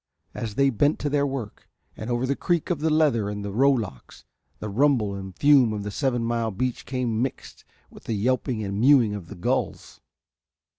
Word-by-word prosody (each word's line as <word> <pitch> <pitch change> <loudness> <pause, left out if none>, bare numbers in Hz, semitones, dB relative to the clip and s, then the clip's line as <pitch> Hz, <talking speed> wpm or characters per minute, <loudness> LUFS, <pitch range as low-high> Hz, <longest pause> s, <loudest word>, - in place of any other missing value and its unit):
As 110 -3 -5
they 140 0 +3
bent 145 +6 +2
to 145 - -1
their 145 -1 +2
work 130 -6 -6 0.3
and 110 - -7
over 120 +1 0
the 140 +2 0
creak 175 +1 -1
of 170 - -1
the 160 +2 +1
leather 145 -10 +2
in 105 0 -5
the 100 - -4
rowlocks 115 - 0 0.3
the 105 - -6
rumble 115 -2 +2
and 95 -2 -8
fume 140 -6 +5
of 105 -1 -4
the 105 - -4
seven 120 +1 -1
mile 115 -1 -1
beach 125 +4 -3
came 120 -4 -1
mixed 130 0 -5 0.3
with - - -15
the 115 - -2
yelping 120 +1 0
and 100 0 -3
mewing 125 -5 +5
of 100 -5 -7
the - - -9
gulls. 85 - -3
120 Hz, 195 wpm, -25 LUFS, 105-140 Hz, 0.3 s, fume